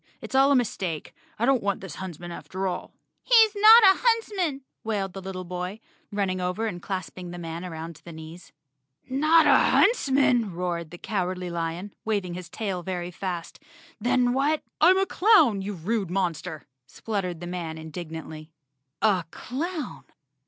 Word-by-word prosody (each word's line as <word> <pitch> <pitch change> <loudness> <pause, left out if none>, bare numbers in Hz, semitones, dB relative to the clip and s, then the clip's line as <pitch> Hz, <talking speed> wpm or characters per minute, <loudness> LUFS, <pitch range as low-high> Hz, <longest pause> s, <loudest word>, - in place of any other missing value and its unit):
It's - - -9
all 270 +1 +5
a - - +5
mistake. 190 - -2 0.2
I 230 - +1
don't 265 -2 +3
want 200 -1 -1
this 185 -6 -8
huntsman 175 -2 -7
after 185 +2 -5
all." 185 - -4 0.3
"He's 450 -3 +6
not 440 +3 +9
a 385 -1 +6
huntsman," 410 - +1 0.2
wailed 200 -4 -2
the 195 - -7
little 185 -1 -6
boy, 180 +3 -5 0.3
running 195 -3 -1
over 180 +5 -1
and 180 -6 -4
clasping 185 -2 -5
the 175 - -7
man 165 0 -6
around 165 -2 -7
the 170 - -10
knees. 160 +2 -11 0.6
"Not 305 +5 +4
a - - +6
huntsman?" 265 - +3
roared 170 -2 -3
the 175 - -10
Cowardly 180 -3 -3
Lion, 170 +4 -4
wav¬ 210 -3 0
ing 175 - -6
his 180 -1 -7
tail 195 -3 -3
very 175 0 -4
fast. 175 -2 -5 0.4
"Then 245 0 +2
what—" 290 +4 +1 0.2
"I'm 375 +1 +7
a 385 - +3
clown, 355 - +4
you 205 +2 -4
rude 195 +3 -2
monster," 175 -3 -2 0.2
spluttered 185 -1 -4
the 175 - -7
man 175 -3 -5
indignantly. 160 -1 -8 0.5
A 195 -6 +3
clown! 310 - -5
190 Hz, 160 wpm, -26 LUFS, 175-255 Hz, 0.6 s, not